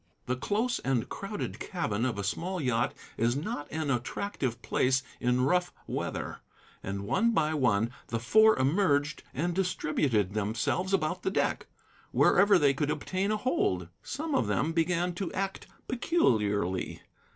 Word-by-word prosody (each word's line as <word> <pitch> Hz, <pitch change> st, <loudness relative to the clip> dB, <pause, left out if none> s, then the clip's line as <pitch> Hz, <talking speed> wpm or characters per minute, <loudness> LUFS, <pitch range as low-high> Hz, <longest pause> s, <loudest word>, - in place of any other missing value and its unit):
The 125 Hz, -, 0 dB
close 220 Hz, -, 0 dB
and 130 Hz, -4 st, 0 dB
crowded 200 Hz, +1 st, -5 dB
cabin 120 Hz, -, -2 dB
of 125 Hz, -5 st, -1 dB
a 100 Hz, -, -2 dB
small 175 Hz, -, -2 dB
yacht 125 Hz, -5 st, 0 dB, 0.2 s
is 115 Hz, +2 st, +2 dB
not 145 Hz, 0 st, -4 dB
an 155 Hz, -2 st, -1 dB
attractive 130 Hz, -, -2 dB
place 130 Hz, +1 st, +2 dB, 0.2 s
in 125 Hz, +1 st, +2 dB
rough 180 Hz, +4 st, +2 dB
weather; -, -, -4 dB, 0.4 s
and 100 Hz, +1 st, -4 dB
one 230 Hz, -, +2 dB
by 155 Hz, -6 st, +2 dB
one 115 Hz, -6 st, +2 dB, 0.2 s
the 115 Hz, -, -2 dB
Four 220 Hz, -, +5 dB
emerged 145 Hz, +1 st, +2 dB
and 170 Hz, +6 st, -1 dB
distributed 150 Hz, -, 0 dB
themselves 110 Hz, -, -1 dB
about 180 Hz, -1 st, 0 dB
the -, -, 0 dB
deck, 190 Hz, -, 0 dB, 0.4 s
wherever 200 Hz, -1 st, +5 dB
they 145 Hz, -5 st, +4 dB
could 145 Hz, +2 st, -1 dB
obtain 190 Hz, +5 st, -1 dB
a 215 Hz, -, +1 dB
hold. 95 Hz, -, 0 dB
Some 305 Hz, +3 st, -4 dB
of 270 Hz, -, +2 dB
them 155 Hz, -, +1 dB
began 175 Hz, +2 st, +1 dB
to 180 Hz, +1 st, -4 dB
act 195 Hz, 0 st, -3 dB, 0.2 s
peculiarly. 105 Hz, -, +1 dB
150 Hz, 150 wpm, -29 LUFS, 120-190 Hz, 0.4 s, Four